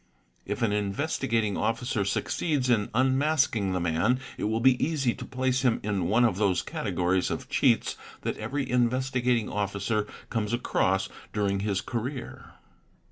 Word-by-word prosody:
If - - -2
an 110 - +2
Investigating 110 +1 0
_ - - -3
Officer 115 -1 0
succeeds 130 - 0
in 105 -3 +2
unmasking 130 -5 +2
the 90 - 0
man 85 +9 +1 0.2
it - - -3
will 110 +2 0
be 125 +1 +4
easy 140 -6 +1
to - - -8
place 130 0 0
him 125 -3 +2
in 100 -4 -1
one 115 +6 +3
_ - - +7
of 100 -5 -2
those 100 -3 +2
categories 90 +1 0
of 130 0 -4
cheats 130 -5 +2 0.2
that - - -2
every 140 -1 -3
Investigating 125 -1 +1
Officer 105 +1 -1 0.2
comes 110 -2 -1
across 95 -5 +1 0.3
during 100 -2 0
his 100 -1 0
career. 120 +2 -5
115 Hz, 155 wpm, -27 LUFS, 100-130 Hz, 0.3 s, _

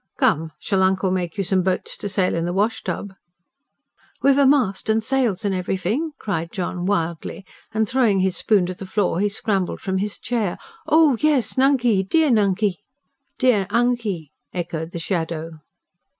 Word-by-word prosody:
"Come, 160 +1 +2
shall 195 +4 0
uncle 190 0 +2
make 180 -2 -2
you 195 - 0
some 185 0 +2
boats 185 0 -1
to 205 - -5
sail 190 -2 +1
in 165 0 -1
the 175 - -2
wash 210 +4 0
tub?" 200 -1 -4 1.1
"Wiv 275 0 +5
a 280 - +5
mast 250 -9 +2
an' 220 +1 +3
sails 225 -5 0
an' 200 - +1
everyfing?" 190 - -2
cried 170 -5 -3
John 180 -1 -3
wildly; 170 0 -2 0.3
and 220 0 0
throwing 230 -6 +2
his 190 -1 +1
spoon 205 -5 +2
to 185 - -4
the 190 +1 -9
floor, 190 -3 0
he 205 +1 +2
scrambled 200 -3 -1
from 190 -1 -2
his 205 +1 -3
chair. 225 -7 -2 0.3
"Oh 310 -5 +5
yes, 280 -8 +2
Nunkey 255 -6 +3
dear 300 +10 +2
Nunkey!" 200 -3 +2 0.6
"Dea 225 -7 +3
Unkey!" 225 - 0 0.2
echoed 165 -2 -4
the 170 - -7
shadow. 165 -2 -3
195 Hz, 165 wpm, -22 LUFS, 180-230 Hz, 1.1 s, Wiv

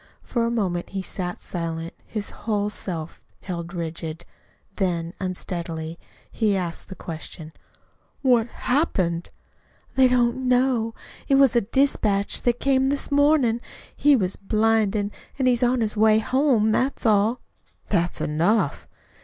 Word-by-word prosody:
For 235 -2 -1
a - - 0
moment 190 -7 -1
he 195 -1 -4
sat 180 -1 -4
silent, 165 -1 -2
his 215 -2 -4
whole 210 -2 -2
self 170 -6 -5 0.2
held 175 -2 -5
rigid. 165 -1 -5 0.5
Then, 170 -3 -1
unsteadily 170 -3 -4 0.3
he 210 -4 +1
asked 175 -2 -4
the 190 - -7
question: 160 -1 -8 0.7
"What 245 -3 +4
happened?" 190 - 0 0.7
"They 265 -1 +6
don't 250 +1 +1
know. 245 -3 +2 0.3
It 275 - +4
was 270 -3 +5
a 235 - +5
dispatch 210 -4 +1
that 240 -1 +1
came 265 -1 +2
this 285 +1 0
mornin'. 285 -5 +3 0.3
He 290 0 +5
was 190 -6 -1
blinded, 215 -1 +1 0.3
an' 265 - 0
is 245 -2 +3
on 245 0 +2
his 215 -1 -1
way 215 0 +5
home. 245 -2 +2
That's 260 +4 0
all." 215 +2 +3 0.5
"That's 175 +1 +1
enough." 170 +3 +1
215 Hz, 135 wpm, -24 LUFS, 175-245 Hz, 0.7 s, They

